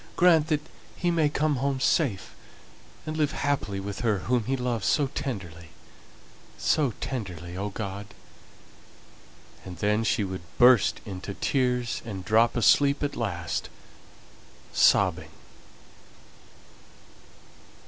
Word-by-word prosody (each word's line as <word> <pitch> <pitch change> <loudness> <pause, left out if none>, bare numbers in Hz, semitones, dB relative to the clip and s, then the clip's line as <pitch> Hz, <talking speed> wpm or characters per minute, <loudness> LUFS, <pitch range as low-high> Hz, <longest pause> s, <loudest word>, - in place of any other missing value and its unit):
Grant 165 -3 +5
that 150 -1 -1 0.3
he 175 -1 0
may 160 -3 +2
come 150 -1 0
home 135 +1 -1
safe, 130 - 0 0.7
and 155 - -4
live 150 -2 0
happily 135 -9 -1
with 100 +1 -6
her 110 -4 +1
whom 120 +4 -1
he 135 +3 -1
loves 120 -5 -2
so 140 -3 +2
tenderly 85 - -5 0.9
so 140 -7 +1
tenderly, 90 -9 -5
O 100 +2 -3
God." 100 -1 -6 1.6
And 90 -2 -9
then 105 +4 +1
she 110 0 +1
would 95 -2 -5 0.2
burst 120 -4 +5
into 95 0 -7
tears, 125 -3 0
and 100 -5 -7
drop 115 +4 +3
asleep 140 +6 +4
at 145 - -2
last, 85 -7 -3 1.0
sobbing. - - +3
115 Hz, 115 wpm, -26 LUFS, 100-140 Hz, 1.6 s, Grant